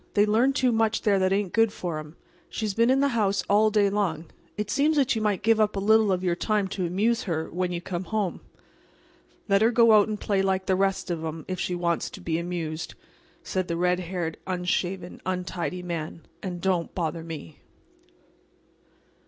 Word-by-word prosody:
They 205 Hz, 0 st, +5 dB
learn 230 Hz, +6 st, +3 dB
too 255 Hz, -2 st, +2 dB
much 225 Hz, -1 st, +1 dB
there 200 Hz, -2 st, +3 dB
that 185 Hz, 0 st, +2 dB
ain't 195 Hz, -2 st, 0 dB
good 225 Hz, -1 st, +3 dB
for 170 Hz, -6 st, -4 dB
'em. 155 Hz, +1 st, -10 dB, 0.3 s
She's 215 Hz, -2 st, -3 dB
been 230 Hz, +3 st, +3 dB
in 265 Hz, +1 st, +4 dB
the 280 Hz, -, +3 dB
house 200 Hz, -6 st, +1 dB
all 210 Hz, +2 st, +4 dB
day 210 Hz, -1 st, +3 dB
long. 190 Hz, -6 st, -1 dB, 0.3 s
It 210 Hz, 0 st, -3 dB
seems 300 Hz, +2 st, +2 dB
that 275 Hz, -3 st, +3 dB
you 220 Hz, -, -1 dB
might 210 Hz, -2 st, 0 dB
give 225 Hz, +1 st, +4 dB
up 215 Hz, -1 st, +2 dB
a -, -, -1 dB
little 215 Hz, +1 st, +4 dB
of 185 Hz, 0 st, 0 dB
your 175 Hz, -2 st, +1 dB
time 210 Hz, +1 st, 0 dB
to 185 Hz, -2 st, -2 dB
amuse 215 Hz, +7 st, 0 dB
her 160 Hz, -4 st, -2 dB
when 180 Hz, +1 st, -1 dB
you 170 Hz, -1 st, -3 dB
come 175 Hz, +1 st, -4 dB
home." 210 Hz, -3 st, -2 dB, 1.1 s
"Let 200 Hz, -1 st, +3 dB
her 225 Hz, -, +5 dB
go 230 Hz, -1 st, +5 dB
out 210 Hz, -1 st, +6 dB
and 215 Hz, -1 st, -3 dB
play 200 Hz, -2 st, 0 dB
like 190 Hz, -1 st, 0 dB
the 190 Hz, -, +2 dB
rest 195 Hz, -1 st, 0 dB
of 165 Hz, -2 st, -3 dB
'em 160 Hz, 0 st, -5 dB
if 185 Hz, -1 st, -4 dB
she 180 Hz, -, -1 dB
wants 170 Hz, -1 st, -1 dB
to -, -, -10 dB
be 165 Hz, -3 st, -2 dB
amused," 170 Hz, -2 st, -4 dB, 0.5 s
said 185 Hz, -1 st, -2 dB
the 170 Hz, -, -2 dB
red 180 Hz, +1 st, +2 dB
haired, 175 Hz, -2 st, -4 dB
unshaven, 180 Hz, 0 st, -2 dB
untidy 180 Hz, -2 st, -3 dB
man, 165 Hz, -2 st, -5 dB, 0.2 s
"and 175 Hz, -2 st, -5 dB
don't 180 Hz, -3 st, 0 dB
bother 165 Hz, -1 st, -2 dB
me." 160 Hz, -, -8 dB
190 Hz, 200 wpm, -26 LUFS, 175-215 Hz, 1.1 s, out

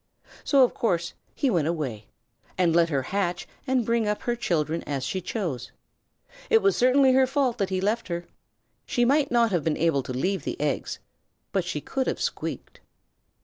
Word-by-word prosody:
So, 275 Hz, -2 st, +5 dB
of 250 Hz, -, +2 dB
course, 170 Hz, -7 st, -1 dB, 0.2 s
he 270 Hz, -, +1 dB
went 165 Hz, -6 st, +1 dB
away, 135 Hz, -11 st, -3 dB, 0.5 s
and 175 Hz, -3 st, +3 dB
let 170 Hz, -1 st, +4 dB
her 140 Hz, -4 st, 0 dB
hatch 180 Hz, +2 st, -2 dB, 0.2 s
and 255 Hz, -3 st, +1 dB
bring 230 Hz, -1 st, +1 dB
up 210 Hz, 0 st, -1 dB
her 240 Hz, -, 0 dB
children 165 Hz, -8 st, -1 dB
as 140 Hz, -3 st, -3 dB
she 185 Hz, +7 st, -2 dB
chose. 175 Hz, -, -4 dB, 0.8 s
It 450 Hz, 0 st, +4 dB
was 395 Hz, -1 st, +4 dB
certainly 260 Hz, +1 st, +5 dB
her 260 Hz, 0 st, +4 dB
fault 265 Hz, -3 st, 0 dB
that 195 Hz, -1 st, 0 dB
he 190 Hz, -1 st, -1 dB
left 215 Hz, +5 st, 0 dB
her. 175 Hz, -1 st, -4 dB, 0.6 s
She 240 Hz, -, +2 dB
might 275 Hz, +2 st, +3 dB
not 235 Hz, -2 st, +3 dB
have 175 Hz, -5 st, +1 dB
been 155 Hz, 0 st, 0 dB
able 160 Hz, -4 st, +2 dB
to 130 Hz, -, -7 dB
leave 185 Hz, +10 st, -1 dB
the -, -, -4 dB
eggs, 145 Hz, -2 st, -1 dB, 0.5 s
but 190 Hz, -2 st, 0 dB
she 175 Hz, -4 st, -3 dB
could 265 Hz, -, -2 dB
have -, -, -1 dB
squeaked. -, -, -4 dB
190 Hz, 190 wpm, -26 LUFS, 165-240 Hz, 0.8 s, So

